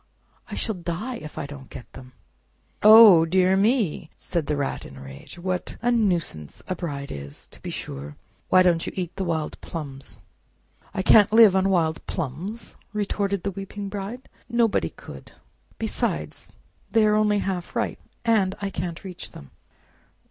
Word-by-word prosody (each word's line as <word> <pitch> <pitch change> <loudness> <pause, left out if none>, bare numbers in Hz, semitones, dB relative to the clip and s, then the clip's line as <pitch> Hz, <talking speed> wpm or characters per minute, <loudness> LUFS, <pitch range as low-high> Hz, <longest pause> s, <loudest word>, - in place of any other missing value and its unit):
I - - -5
shall 220 - -1
die 180 +8 -4
if 155 -6 -10
I - - -3
don't 140 -2 -10
get - - -11
them!" 130 -1 -12 0.7
"Oh, 215 -5 +9
dear 185 +3 +3
me!" 200 - +1 0.2
cried 165 -5 0
the 150 - 0
Rat 140 -1 -2
in 70 - -11
a - - -10
rage, 70 - -11
"what 180 0 -3
a 240 +1 +1
nuisance 175 - -1
a 185 - -1
bride 145 -6 -5
is, 70 0 -9
to - - -16
be - - -6
sure! 70 +2 -6 0.3
Why 185 - +6
don't 170 -2 +2
you - - -4
eat 180 -2 -4
the 195 - -2
wild 160 -4 -3
plums?" 140 -4 -8 0.7
"I 190 -1 -2
can't 210 0 +6
live 220 -3 +7
on 190 0 +3
wild 160 -4 +1
plums!" 175 - -5 0.2
retorted 200 -2 -1
the 200 - -1
weeping 195 +1 -6
Bride; 205 +6 -6 0.2
"nobody 235 -2 +2
could; - - -12 0.4
besides, - - -3 0.4
they 225 -1 +4
are 210 - +4
only 210 -1 +3
half 190 -3 -3
ripe, - - -1 0.3
and 205 -5 +2
I 200 -1 -3
can't 170 -1 -5
reach 185 -2 -8
them." 70 - -12
185 Hz, 165 wpm, -24 LUFS, 155-205 Hz, 0.7 s, Oh